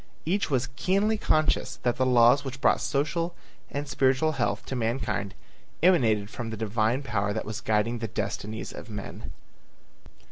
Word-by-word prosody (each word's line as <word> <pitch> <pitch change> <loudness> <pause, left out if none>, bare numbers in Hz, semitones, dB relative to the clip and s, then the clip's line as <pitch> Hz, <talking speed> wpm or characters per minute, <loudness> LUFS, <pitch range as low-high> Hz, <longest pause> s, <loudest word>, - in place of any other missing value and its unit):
Each 190 +2 0
was 130 -3 +1
keenly 200 +8 +2
conscious 155 -7 +1
that 120 -1 +1
the 130 - +2
laws 125 +3 +5
which 135 -1 -6
brought - - +3
social 165 +5 -1 0.3
and 145 +1 -4
spiritual 135 +4 +2
health 135 -6 -1
to 135 - -4
mankind 110 -4 -2 0.5
emanated 115 - +4
from 120 -1 -5
the 110 - -5
divine 110 +4 0
power 105 -5 -1
that 110 - -3
was 110 0 -5
guiding 110 +2 +1
the 115 - -3
destinies 110 0 -4
of - - -9
men. 105 -2 -7
125 Hz, 155 wpm, -27 LUFS, 110-145 Hz, 0.5 s, laws